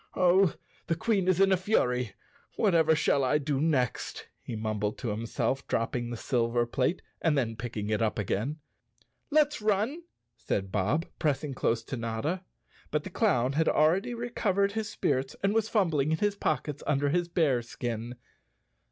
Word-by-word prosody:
"Oh, 185 Hz, 0 st, +4 dB, 0.3 s
the 165 Hz, -, +1 dB
Queen 195 Hz, +1 st, 0 dB
is 185 Hz, -1 st, +3 dB
in 195 Hz, 0 st, +5 dB
a 190 Hz, -, +5 dB
fury, 125 Hz, -, 0 dB, 0.4 s
whatever 165 Hz, -6 st, +4 dB
shall 150 Hz, -2 st, +2 dB
I 130 Hz, +3 st, +3 dB
do 145 Hz, -2 st, -1 dB
next," 140 Hz, -7 st, -1 dB
he 115 Hz, -, -6 dB
mumbled 110 Hz, -1 st, -2 dB
to 120 Hz, -, -3 dB
himself, 115 Hz, +5 st, -2 dB
dropping 120 Hz, +1 st, -1 dB
the 120 Hz, -, -4 dB
silver 120 Hz, 0 st, +1 dB
plate 130 Hz, +8 st, -1 dB, 0.2 s
and 160 Hz, -3 st, +2 dB
then 115 Hz, -4 st, 0 dB
picking 110 Hz, -2 st, -4 dB
it 105 Hz, -, +1 dB
up 110 Hz, -1 st, 0 dB
again. 110 Hz, -, -1 dB, 0.4 s
" -, -, -39 dB
Let's 295 Hz, -5 st, +1 dB
run," 215 Hz, -, +1 dB, 0.3 s
said 100 Hz, -4 st, -3 dB
Bob, 105 Hz, -, +1 dB
pressing 150 Hz, -2 st, 0 dB
close 115 Hz, -2 st, 0 dB
to 130 Hz, -, -5 dB
Notta. 115 Hz, +10 st, -2 dB, 0.5 s
But 150 Hz, 0 st, -1 dB
the 190 Hz, -, -7 dB
clown 130 Hz, -, +2 dB
had 160 Hz, +3 st, +2 dB
already 180 Hz, +10 st, +2 dB
recovered 205 Hz, -4 st, 0 dB
his 220 Hz, +1 st, -3 dB
spirits 135 Hz, -10 st, -1 dB
and 200 Hz, +1 st, +2 dB
was 220 Hz, 0 st, +1 dB
fumbling 160 Hz, -, +2 dB
in 160 Hz, -, +2 dB
his 205 Hz, +3 st, +1 dB
pockets 150 Hz, -6 st, -2 dB
under 145 Hz, -1 st, +2 dB
his 175 Hz, +3 st, +1 dB
bear 155 Hz, -8 st, +2 dB
skin. 120 Hz, 0 st, -5 dB
150 Hz, 170 wpm, -29 LUFS, 120-185 Hz, 0.5 s, in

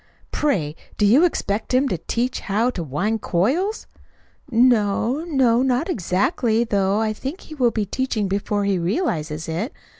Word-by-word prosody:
Pray, 180 Hz, -, 0 dB, 0.2 s
do 210 Hz, -, +3 dB
you 245 Hz, +11 st, +5 dB
expect 225 Hz, -, -1 dB
him 270 Hz, +2 st, +3 dB
to 180 Hz, -10 st, -2 dB
teach 245 Hz, +8 st, -2 dB
how 220 Hz, +5 st, 0 dB
to 185 Hz, -, -5 dB
wind 200 Hz, +10 st, -1 dB
coils?" 305 Hz, -, 0 dB, 0.6 s
"No 235 Hz, +2 st, +2 dB
no 260 Hz, -7 st, +3 dB
not 265 Hz, +6 st, +1 dB
exactly; 225 Hz, -, +1 dB
though 200 Hz, -2 st, +1 dB
I 220 Hz, -1 st, 0 dB
think 270 Hz, -, -6 dB
he -, -, -11 dB
will 255 Hz, -5 st, +2 dB
be 215 Hz, -2 st, -2 dB
teaching 220 Hz, -1 st, -1 dB
before 200 Hz, +1 st, -1 dB
he 195 Hz, -2 st, +1 dB
realizes 170 Hz, -, -2 dB
it. 175 Hz, -, -3 dB
225 Hz, 155 wpm, -22 LUFS, 195-260 Hz, 0.6 s, you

